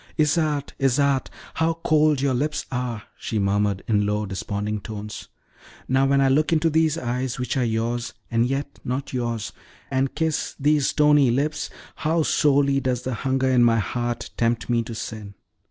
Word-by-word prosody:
"Isarte, 150 -2 +1
Isarte, 135 0 +2 0.3
how 160 0 +1
cold 155 -2 +3
your 140 -1 +2
lips 150 +5 -1
are!" 125 -3 -3 0.2
she 110 - -3
murmured, 100 -1 +1
in 105 -2 +2
low, 105 +1 0
desponding 105 +2 -3
tones. 105 0 -7 0.6
"Now, 135 +1 +3
when 140 0 +3
I 135 - +4
look 150 +5 +2
into 165 0 +2
these 160 0 +2
eyes, 125 -2 -2
which 125 +1 -2
are 130 - +1
yours, 115 +1 -2 0.2
and 115 +1 +2
yet 135 +2 -3
not 130 +3 -3
yours, 120 -4 -2 0.4
and 135 0 0
kiss 160 -1 -1
these 145 0 +3
stony 150 -3 +4
lips, 145 +5 -1 0.3
how 160 +1 +1
sorely 140 -2 +3
does 125 -2 -1
the 130 - -2
hunger 130 +2 0
in 125 -2 +5
my 115 -1 +4
heart 120 +2 -2
tempt 115 +1 0
me 120 -1 +3
to 115 -1 -6
sin! 110 -2 -7
130 Hz, 170 wpm, -24 LUFS, 115-145 Hz, 0.6 s, in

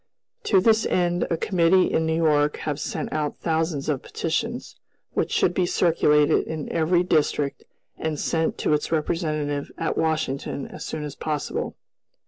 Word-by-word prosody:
To 195 - +4
this 220 +3 +3
end 175 -1 +1
a 165 - 0
committee 180 +1 +3
in 160 - +1
New 160 - +1
York 150 -2 +2
have 150 -1 -3
sent - - -4
out 150 -1 -2
thousands 160 -3 -1
of 145 -4 0
petitions, - - -3 0.4
which - - -1
should 175 - +2
be 180 0 +1
circulated 150 -4 +3
in 155 -2 -5
every 170 +2 +2
district 150 -4 0 0.3
and 155 -2 -2
sent 160 -1 0
to - - +1
its 150 - -1
representative 155 -3 -1
at 165 - -1
Washington 155 -3 -1
as - - -9
soon 155 - -4
as 145 -2 -5
possible. 150 -2 -3
160 Hz, 155 wpm, -24 LUFS, 150-170 Hz, 0.4 s, To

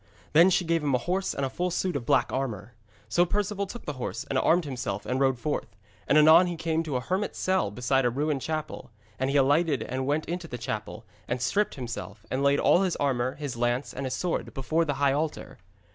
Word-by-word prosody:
Then 170 +4 +7
she 180 -1 +2
gave 165 0 +1
him 140 -3 +2
a 120 - -2
horse 190 +2 0
and 140 - -1
a - - -2
full 180 +5 -1
suit 180 0 -1
of 120 -4 -4
black 135 -4 +2
armour. 120 -5 -3 0.3
So 175 +11 +3
Perceval 200 +2 -1
took 240 - -9
the 150 - -3
horse, 115 0 -3
and 135 - +2
armed 170 0 +3
himself 125 -7 -4
and 130 +1 -1
rode 135 -2 +2
forth. 130 -6 -3 0.3
And 150 - +4
anon 160 +4 +7
he 175 - -3
came 160 0 -1
to 155 -5 -4
a 125 - 0
hermit's 185 +9 -2
cell 185 - +1
beside 125 +5 +1
a 120 - +3
ruined 145 +2 -1
chapel, 155 +1 -4 0.3
and 130 +1 0
he 140 - +2
alighted 140 -1 +3
and 130 +1 -3
went 150 +2 0
into 175 0 -4
the 125 - -6
chapel, 115 -2 -5 0.2
and 120 - -2
stripped 205 - 0
himself, 110 -5 -7
and 130 - 0
laid 140 0 +3
all 175 - +4
his 185 -3 0
armour, 130 -2 0
his 145 -4 -5
lance, 120 +3 -1
and 135 0 -4
his 130 - -2
sword, 180 +3 -3
before 155 +5 0
the 145 -3 -1
high 140 0 +2
altar. 150 +2 -3
140 Hz, 230 wpm, -27 LUFS, 125-165 Hz, 0.3 s, Then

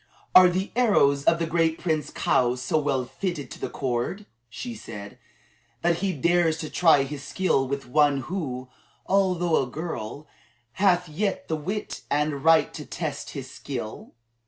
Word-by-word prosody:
"Are 185 0 +9
the 185 +3 -2
arrows 140 - +3
of 165 - +5
the 165 - -1
great 165 0 +1
Prince 155 -4 -1
Kaou 125 0 +1
so 140 +6 0
well 135 -4 0
fitted 170 0 -4
to - - -9
the - - -3
cord," 130 - -2 0.2
she 240 - -6
said, 105 - -9 0.6
"that 170 -1 +3
he 195 +2 0
dares 170 +1 +2
to 155 - -6
try 160 -6 +5
his 140 0 -6
skill 145 -4 0
with 140 +1 -3
one 145 0 +3
who, 130 -8 -4 0.4
although 180 -4 +2
a 130 - -3
girl, 150 -2 -6 0.5
hath 180 +3 +2
yet 195 +6 -2
the 160 - +1
wit 190 +8 -4
and 145 -1 0
right 160 -2 +5
to - - -6
test - - -5
his - - -7
skill?" 120 -6 -7
155 Hz, 160 wpm, -25 LUFS, 140-180 Hz, 0.6 s, Are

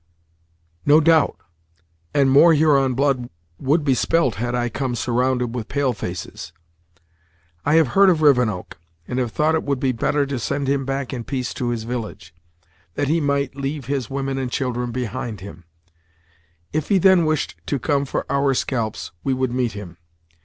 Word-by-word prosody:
"No 150 +2 +6
doubt; 160 -1 +4 0.8
and 140 -2 +3
more 160 +4 +7
Huron 140 -4 +3
blood 130 -2 0 0.3
would 150 +4 +1
be 135 - +3
spilt 145 0 +2
had 120 0 -1
I 120 0 0
come 125 +1 -3
surrounded 125 +1 0
with 115 -3 -4
pale 140 -2 0
faces. 90 -4 -6 1.1
I 145 - +3
have 160 -5 +4
heard 195 +9 +5
of 160 -4 +2
Rivenoak, 125 - +2 0.3
and 125 - -2
have 120 -3 -1
thought 155 +5 +1
it 160 - +1
would 140 -2 -2
be 130 0 +1
better 140 +4 0
to 135 -2 -3
send 140 +4 -2
him 135 0 0
back 135 -1 -3
in 120 -2 -4
peace 130 -1 -3
to 125 -2 -2
his 115 -2 -2
village, 110 -8 -6 0.6
that 145 - -1
he 165 +2 +2
might 140 -2 0
leave 140 0 -4
his 135 -2 -2
women 135 0 -2
and 130 -1 -2
children 125 -3 -2
behind 120 -3 -4
him; 95 -3 -11 1.1
if 155 -1 -2
he 200 - +4
then 190 -1 +5
wished 155 - -1
to 140 - 0
come 140 +2 0
for - - -3
our 140 -1 +1
scalps, 115 -5 -2
we 135 -1 0
would 130 -1 -1
meet 125 -2 0
him. 95 -5 -9
135 Hz, 175 wpm, -21 LUFS, 120-145 Hz, 1.1 s, more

